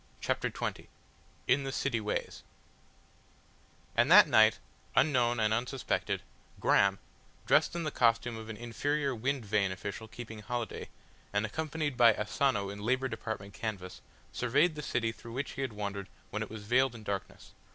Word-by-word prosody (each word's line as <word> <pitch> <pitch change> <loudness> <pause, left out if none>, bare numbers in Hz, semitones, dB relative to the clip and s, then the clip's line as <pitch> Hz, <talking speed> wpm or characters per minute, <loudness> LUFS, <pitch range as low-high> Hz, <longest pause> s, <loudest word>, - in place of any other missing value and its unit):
CHAPTER - - -1
XX - - -4 0.6
IN 140 +1 +3
THE 135 - -3
CITY 130 -4 -1
WAYS 105 - -3 1.5
And - - +4
that - - +9
night, - - +6 0.4
unknown 120 -5 +3
and 110 0 +2
unsuspected, 125 +3 -1 0.4
Graham, 100 0 +4 0.5
dressed - - +3
in 170 - -2
the 155 - -2
costume 115 0 +2
of 110 0 -8
an 110 - -6
inferior 140 +5 -1
wind 130 +1 -2
vane 100 -2 +1
official 100 +4 -6
keeping 110 -1 -8
holiday, 120 +1 -4 0.4
and 100 +1 +1
accompanied 150 +2 -3
by 120 -2 +7
Asano 105 -2 0
in 100 - -8
Labour 130 +5 0
Department 100 -5 -5
canvas, 100 -5 -5 0.3
surveyed 145 +8 +2
the 150 - -6
city 115 -5 0
through 115 0 -11
which 135 +3 -3
he - - -5
had 135 -3 -2
wandered 100 -2 -4 0.2
when 105 - -3
it 110 - -4
was 110 -1 -8
veiled 125 +3 +2
in 110 - -10
darkness. 100 -2 -5
115 Hz, 160 wpm, -31 LUFS, 105-135 Hz, 1.5 s, that